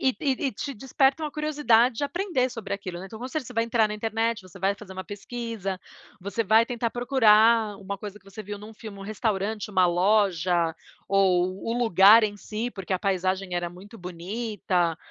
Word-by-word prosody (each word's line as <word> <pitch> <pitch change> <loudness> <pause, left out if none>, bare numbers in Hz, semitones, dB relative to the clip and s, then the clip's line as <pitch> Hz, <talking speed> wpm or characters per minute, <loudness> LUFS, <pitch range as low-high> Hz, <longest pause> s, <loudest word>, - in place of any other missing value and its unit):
E 260 -1 +2
e 285 -3 +1 0.2
e - - -2
te 280 +7 -5
desperta 270 +5 +1
uma 300 - -3
curiosidade 280 -6 +2
de 285 - -1
aprender 345 -6 0
sobre 220 -5 -6
aquilo, 185 -3 -5
né. 190 - -7
Então, 220 - -10
com 245 - -5
certeza, 260 -1 -4
você - - -9
vai 230 0 +2
entrar 230 -2 +2
na 210 - -4
internet, 225 +1 -1
você 185 +1 -14
vai 195 +2 +2
fazer 190 -3 -11
uma 190 - -6
pesquisa, 205 -2 -5 0.4
você 200 +4 -2
vai 220 +3 +5
tentar 235 -1 -2
procurar 225 -4 +4
uma 200 0 -6
coisa 205 0 -8
que 190 - -32
você 195 +2 -10
viu 205 0 -6
num 210 +2 -11
filme, 215 -2 -10
um - - -8
restaurante, 210 0 -2
uma 185 -2 +4
loja 180 -2 +2 0.4
ou 185 -2 +3 0.2
o 230 - 0
lugar 220 -1 +7
em 205 -1 -1
si, 215 +4 -4
porque 195 -4 -6
a 185 - +1
paisagem 190 -1 -1
era 175 0 -2
muito 195 +6 -13
bonita, 180 -1 -2
210 Hz, 205 wpm, -26 LUFS, 190-230 Hz, 0.4 s, lugar